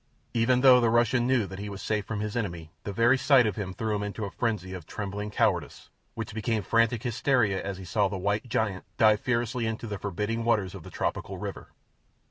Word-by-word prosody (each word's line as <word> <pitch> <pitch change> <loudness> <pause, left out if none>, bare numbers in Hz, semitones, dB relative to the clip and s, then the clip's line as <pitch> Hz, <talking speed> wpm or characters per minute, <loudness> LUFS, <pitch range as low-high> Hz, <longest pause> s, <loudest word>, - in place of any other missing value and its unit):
Even 125 +2 +3
though 130 -2 +8
the 115 - +3
Russian 120 +1 +3
knew 130 -4 +2
that 95 0 -8
he 105 +1 -5
was 100 -1 -7
safe 105 -2 -1
from 105 -2 -3
his 105 +1 -3
enemy, 85 -9 -3
the 100 - -3
very 120 +6 +3
sight 130 -2 +5
of 105 -3 0
him 100 -3 -4
threw 110 +2 -2
him 105 - -2
into 105 +1 -4
a 100 - -6
frenzy 105 -6 -2
of 90 -4 -8
trembling 105 0 -4
cowardice, - - -1 0.2
which 115 -1 -5
became 110 -1 -1
frantic 115 +2 +2
hysteria 120 -4 +1
as 100 -1 -4
he 95 - -9
saw 100 +4 +1
the 95 0 -4
white 105 +6 -1
giant 105 -4 -1
dive 110 -3 +5
fearlessly 120 0 -1
into 110 +1 -4
the 105 -3 -5
forbidding 105 +4 -2
waters 105 -5 +1
of 95 - -8
the - - -11
tropical - - -3
river. - - -6
110 Hz, 220 wpm, -28 LUFS, 100-120 Hz, 0.2 s, though